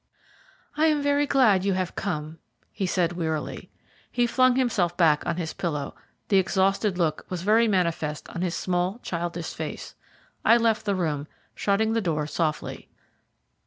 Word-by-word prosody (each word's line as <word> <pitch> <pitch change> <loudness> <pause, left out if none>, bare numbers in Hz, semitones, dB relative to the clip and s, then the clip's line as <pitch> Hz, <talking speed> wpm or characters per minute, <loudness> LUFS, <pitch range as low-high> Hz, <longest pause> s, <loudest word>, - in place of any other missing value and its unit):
"I 315 +1 +4
am 300 -2 +2
very 285 0 +2
glad 220 -10 +4
you 200 -1 +1
have 185 -1 -2
come," 160 -4 -4 0.3
he 190 - -2
said 175 -1 +1
wearily. 160 -3 -3 0.4
He 245 -1 +2
flung 255 +1 +3
himself 205 -10 +1
back 160 -4 +4
on 170 - 0
his 165 -3 -3
pillow; 150 -5 -3 0.4
the 200 - +4
exhausted 190 +1 +1
look 160 -4 0
was 180 -2 -4
very 220 +3 +4
manifest 170 -6 -1
on 175 - -5
his 180 -2 -1
small, 180 +3 -1
childish 170 -1 -4
face. - - -6 0.5
I 230 - +6
left 225 -2 +1
the 200 -2 +1
room, 150 -5 -2 0.3
shutting 220 +2 +1
the 230 - +1
door 155 -5 -1
softly. 155 0 -3
185 Hz, 160 wpm, -25 LUFS, 165-220 Hz, 0.5 s, I